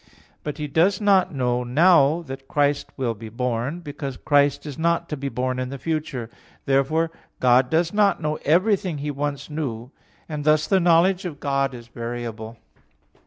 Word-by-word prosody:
But 150 - -5
He 150 - -3
does 170 +7 +2
not 200 -3 +3
know 125 -3 0
now 155 +4 +4
that 135 -2 -9
Christ 145 -1 +1
will 125 -4 -1
be 110 +1 -10
born; 125 +7 -2
because 145 -4 -6
Christ 145 -1 +2
is 145 -3 -6
not 170 +1 +1
to 150 - -2
be 140 -1 -4
born 130 0 -2
in 130 0 -3
the 140 - -6
future. 150 -6 -3 0.4
Therefore 150 +5 +1 0.3
God 125 0 +4
does 170 +2 +1
not 205 -3 +3
know 155 -1 -2
everything 185 +1 +2
He 145 +1 -3
once 140 0 -3
knew; 130 -6 -5 0.4
and 150 -2 -4
thus 155 0 +3
the 195 - +3
knowledge 175 +2 +3
of 155 -5 -6
God 140 -2 0
is 120 -1 -11
variable. 115 -1 -6
145 Hz, 170 wpm, -23 LUFS, 130-165 Hz, 0.4 s, now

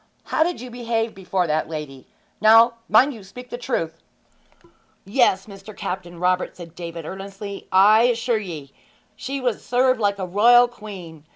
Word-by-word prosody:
How - - -2
did 350 +2 +1
you 250 +1 -9
behave 230 -2 -2
before 190 -1 -2
that 155 -1 -1
lady? 150 -4 -7 0.3
Now, 225 +2 +7 0.2
mind 260 +7 +5
you 220 -4 -11
speak 250 +6 -12
the - - -3
truth!' 165 -11 -3 1.0
'Yes, 195 -2 +2
Mr. 200 0 -12
Captain 175 -2 -5
Robert,' 180 +1 0
said 170 -2 -11
David 170 -2 -7
earnestly. 195 +2 -8
'I 205 +4 +6
assure 235 -1 +1
ye 160 -9 -8 0.4
she 275 +5 -5
was 250 -3 -2
served 255 0 +2
like 200 -2 +1
a 190 - -3
royal 235 +6 +5
queen. 185 -9 -11
200 Hz, 160 wpm, -22 LUFS, 180-240 Hz, 1.0 s, Now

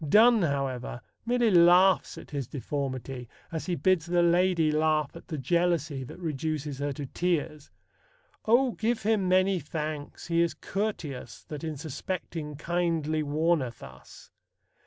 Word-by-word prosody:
Donne, 225 +4 +6
however, 135 -6 -2 0.3
merely 240 -2 +3
laughs 180 +2 +5
at - - -11
his 140 -4 -3
deformity, 130 -2 -4 0.2
as 160 +1 -4
he 180 - 0
bids 185 -3 +2
the 175 0 +3
lady 170 -2 +3
laugh 155 -1 +1
at - - -11
the 155 - -4
jealousy 155 -1 0
that 125 - -10
reduces 155 -3 -3
her 145 0 -1
to 140 +1 -5
tears: 155 -1 -2 0.8
O 245 +3 +4
give 225 0 -1
him 205 -3 +2
many 185 0 +3
thanks, 150 -1 -5
he 170 -1 +2
is 170 -1 +1
courteous, 190 -10 -4
That 150 0 -8
in 160 -2 -4
suspecting 155 0 -5
kindly 165 -1 0
warneth 150 -4 0
us. - - -13
160 Hz, 140 wpm, -28 LUFS, 145-180 Hz, 0.8 s, Donne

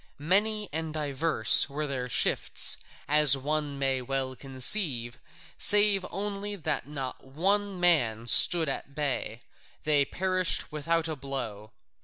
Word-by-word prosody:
Many 210 +7 0
and 160 0 -5
divers 145 -4 +4
were 150 +2 -4
their 130 -3 -5
shifts, - - +2 0.3
as 150 -2 +4
one 145 +1 -4
may 135 -1 -2
well 130 0 -4
conceive, 130 - 0 0.4
save 205 -2 +4
only 205 +1 -6
that 155 -6 -4
not 135 -3 -7
one 195 +8 -2
man 125 -11 0
stood 165 +6 +6
at 140 0 -6
bay: 130 -6 -4 0.4
they 150 -2 +2
perished 185 +3 -1
without 165 +2 -2
a 160 - -5
blow. 120 -7 -7
150 Hz, 125 wpm, -27 LUFS, 135-175 Hz, 0.4 s, stood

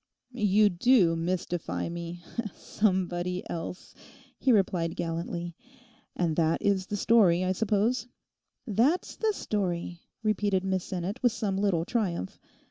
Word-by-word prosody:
'You 210 -3 +3
do 180 -2 +4
mystify 175 0 -2
me—"somebody 180 +1 -2
else"!' 170 +2 -6 0.5
he 265 - +3
replied 180 -6 +2
gallantly. 170 +1 -4 0.6
'And 165 -3 0
that 165 -1 +2
is 195 -2 +1
the 205 - -3
story, 190 -5 +4
I 185 - +1
suppose?' 220 +4 +1 0.6
'That's 250 - +1
the 440 -1 +1
story,' 180 - -3 0.2
repeated 205 -3 +1
Miss 190 -1 -1
Sinnet 190 +5 -4
with 245 -3 +3
some 210 -4 -1
little 190 -4 +1
triumph. 185 - -2
190 Hz, 120 wpm, -28 LUFS, 175-215 Hz, 0.6 s, do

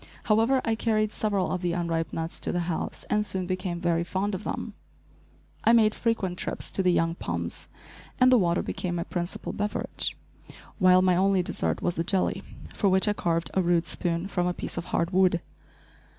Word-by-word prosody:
However, 230 +5 +3
I 225 - +2
carried 215 -1 +1
several 200 -4 -1
of 180 - -2
the 175 -2 0
unripe 170 -2 -1
nuts 165 +1 -4
to - - 0
the 175 - 0
house, 170 -1 -3
and 210 0 +1
soon 190 -3 -2
became 185 -1 -3
very 170 -1 +1
fond 195 +4 -2
of 190 - -4
them. - - -4 0.9
I 230 - +5
made 215 -2 +5
frequent 195 -6 -1
trips - - -3
to - - +4
the 180 -1 +3
young 165 -1 +2
palms - - -4 0.5
and 255 0 +6
the 255 - +7
water 175 -2 +1
became 175 -2 -3
my 170 - -1
principal 175 0 -4
beverage, 205 0 -2 0.6
while 185 -1 +6
my 185 -1 +4
only 190 0 +3
dessert - - -2
was 175 - -1
the 165 - +1
jelly, 190 +2 0 0.3
for 200 - +2
which 190 +2 +3
I 210 - +3
carved 170 -4 -1
a 190 - +2
rude 175 -1 +2
spoon 170 +1 -1
from 180 -3 0
a 180 - -1
piece - - -5
of 170 - -4
hard 170 +2 -1
wood. 185 -2 +3
185 Hz, 195 wpm, -27 LUFS, 175-205 Hz, 0.9 s, the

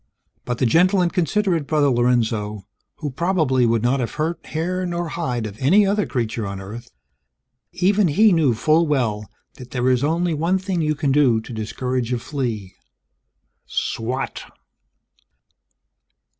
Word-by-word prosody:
But 120 -1 -2
the 130 - +1
gentle 180 - +4
and 175 -1 +1
considerate 180 -3 0
Brother 150 -2 +2
Lorenzo, 115 -5 0 0.3
who 150 -3 -5
probably 150 -5 +1
would 115 -1 +1
not 130 +3 +2
have 120 - -3
hurt 160 +2 -2
hair 180 +4 -2
nor 175 -1 -3
hide 125 -9 -3
of 105 -1 -7
any 190 +10 +5
other 205 +1 +1
creature 115 -4 -2
on 100 -1 -5
Earth 115 +5 -9 0.8
even 195 +2 +2
he 210 +8 +4
knew 155 -9 +3
full 155 +9 +2
well 110 -8 -1 0.3
that 125 -1 -11
there 125 -1 -1
is 125 +1 +1
only 165 +3 +1
one 165 +5 +1
thing 185 -2 -2
you 155 -1 0
can 145 -1 0
do 135 -5 +4
to 120 - -10
discourage 120 +3 -3
a 125 - +1
flea. 115 -7 -4 0.9
Swat! 125 +4 -3
135 Hz, 150 wpm, -21 LUFS, 120-170 Hz, 0.9 s, any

